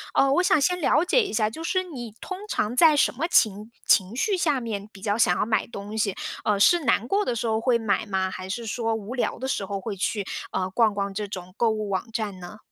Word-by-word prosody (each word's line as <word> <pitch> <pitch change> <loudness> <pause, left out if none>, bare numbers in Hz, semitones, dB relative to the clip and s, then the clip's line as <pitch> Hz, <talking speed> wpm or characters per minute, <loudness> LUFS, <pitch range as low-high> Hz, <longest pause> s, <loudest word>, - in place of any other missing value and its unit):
嗯， 275 0 +4
我 355 - +4
想 310 - +4
先 360 +4 +1
了 310 - +3
解 485 +7 +4
一 - - -4
下， 215 -1 +2
就 320 +9 -8
是 370 +2 0
你 245 - -8
通 375 0 -6
常 215 +4 -1
在 310 +2 +6
什 - - +3
么 310 +7 -2
情 215 - +2 0.2
情 195 +3 +3
绪 395 - +1
下 300 -6 +1
面 210 -3 -5
比 195 - -14
较 205 0 0
想 180 -6 +3
要 - - +1
买 220 -3 0
东 205 -1 -8
西， 205 -3 0 0.3
呃， 205 -2 +2
是 345 - +5
难 235 - +2
过 410 +6 +1
的 240 - -1
时 235 - -3
候 220 0 0
会 240 -1 +3
买 220 -1 0
吗？ 190 -1 -1
还 185 0 -7
是 230 +3 -4
说 225 0 -1
无 220 +3 -6
聊 245 - -1
的 260 - -3
时 205 -7 -1
候 200 -1 -3
会 210 -2 -4
去， 200 +1 -2 0.3
嗯， 185 0 -1
逛 225 -3 +3
逛 200 -1 -2
这 205 +1 -3
种 185 -2 -8
购 235 - +3
物 215 -1 -2
网 195 +4 -3
站 215 -4 -3
呢？ 180 +4 -10
220 Hz, 275 characters per minute, -25 LUFS, 200-260 Hz, 0.3 s, 在